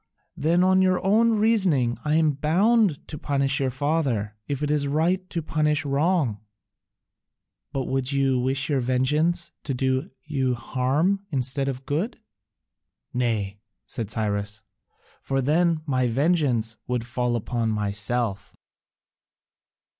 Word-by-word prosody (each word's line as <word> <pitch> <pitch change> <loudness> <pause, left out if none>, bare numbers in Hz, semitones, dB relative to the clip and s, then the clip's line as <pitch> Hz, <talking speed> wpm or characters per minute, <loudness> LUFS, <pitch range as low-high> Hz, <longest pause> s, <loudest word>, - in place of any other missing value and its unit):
"Then 170 +4 +2
on 185 0 +4
your 185 -1 +3
own 225 +4 +4
reasoning, 190 - +2
I 150 0 +1
am 160 -1 +4
bound 180 - +2
to 150 - -7
punish 140 -1 0
your 135 -1 +1
father, 130 -6 -1
if 145 0 -3
it 150 - 0
is 145 -2 +1
right 175 +6 0
to 165 -3 -3
punish 150 -1 0
wrong." 140 - +1 1.3
"But 135 -2 -2
would 130 +1 -1
you 135 -2 +2
wish 130 +2 0
your 145 -3 +1
vengeance 150 +8 +1
to 135 - -2
do 130 +6 0
you 135 -5 -1
harm 145 - 0
instead 135 -1 0
of 135 0 -4
good?" 175 +14 -2 0.9
"Nay," 110 -5 -1 0.3
said 110 -4 -4
Cyrus, 105 -2 -2 0.6
"for 135 0 -1
then 160 +4 +2
my 130 -4 +1
vengeance 125 -5 +1
would 125 -2 -1
fall 120 0 -1
upon 115 0 -1
myself." 105 +1 -1
140 Hz, 130 wpm, -25 LUFS, 125-160 Hz, 1.3 s, on